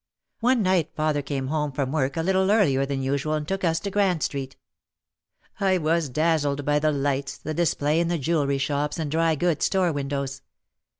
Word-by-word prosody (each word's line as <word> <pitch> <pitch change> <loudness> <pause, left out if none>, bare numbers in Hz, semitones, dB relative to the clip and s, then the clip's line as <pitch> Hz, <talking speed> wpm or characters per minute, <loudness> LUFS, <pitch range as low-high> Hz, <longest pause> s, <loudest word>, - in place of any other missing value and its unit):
One 245 -1 +2
night 185 -4 +2
father 155 -1 0
came 140 -2 -3
home 150 -1 -1
from 135 -1 -2
work 140 0 -1
a 165 - 0
little 190 +1 +2
earlier 140 -11 +3
than 135 -1 -2
usual 140 +3 0
and 150 -1 -3
took 195 0 -2
us 165 -2 +2
to 200 - -4
Grand 190 -5 +1
Street. 135 -2 -4 1.0
I 190 -2 +3
was 165 -2 0
dazzled 145 -1 0
by 145 +1 +2
the 155 +1 +2
lights, 140 -1 -1
the 155 - -5
display 155 -2 +1
in 170 - +1
the 170 0 0
jewelry 145 -2 0
shops 145 +3 -1
and 155 -3 -3
dry 165 0 +2
goods 165 0 +1
store 185 -3 +2
windows. 140 -1 -3
155 Hz, 190 wpm, -25 LUFS, 140-170 Hz, 1.0 s, earlier